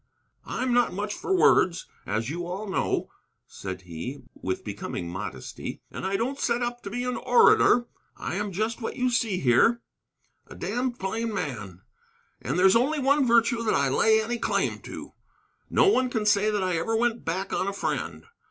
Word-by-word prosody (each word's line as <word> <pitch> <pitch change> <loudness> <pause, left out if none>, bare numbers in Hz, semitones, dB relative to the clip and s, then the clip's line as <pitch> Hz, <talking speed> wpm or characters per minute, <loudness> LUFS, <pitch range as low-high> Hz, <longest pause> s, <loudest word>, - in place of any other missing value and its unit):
"I'm 255 -1 -1
not 245 -1 +3
much 205 +2 -3
for 380 - -1
words, 180 - +4 0.2
as 110 +1 -1
you 170 +4 -4
all 190 +4 -4
know," 190 - -1 0.3
said 95 -1 -7
he, 90 - -7
with 95 0 -4
becoming 85 - -5
modesty, 85 -8 -6
"and - - -4
I 195 - -1
don't 260 +6 -2
set 240 -1 0
up 240 0 -3
to - - -6
be 245 +4 -3
an 250 0 -2
orator. 460 - +5 0.3
I - - -4
am 205 +2 -2
just 220 +6 -2
what 225 - -4
you 255 0 +1
see 225 -6 +1
here, 185 - +4 0.6
a - - -11
damned 245 0 -2
plain 220 +4 -2
man. 105 - -5 0.6
And - - -2
there's 190 +2 +5
only 270 +7 +2
one 280 0 +3
virtue 235 0 +3
that 225 - +1
I 140 -1 +2
lay 220 +11 +4
any 235 +2 -2
claim - - 0
to, - - -9 0.6
no 475 - +4
one 260 -10 +3
can 220 -4 -2
say 210 0 +3
that 205 -2 0
I 180 -2 0
ever 225 +8 -1
went 235 0 0
back 190 +4 -3
on 190 - 0
a - - 0
friend. 200 - -3
215 Hz, 185 wpm, -26 LUFS, 175-240 Hz, 0.6 s, orator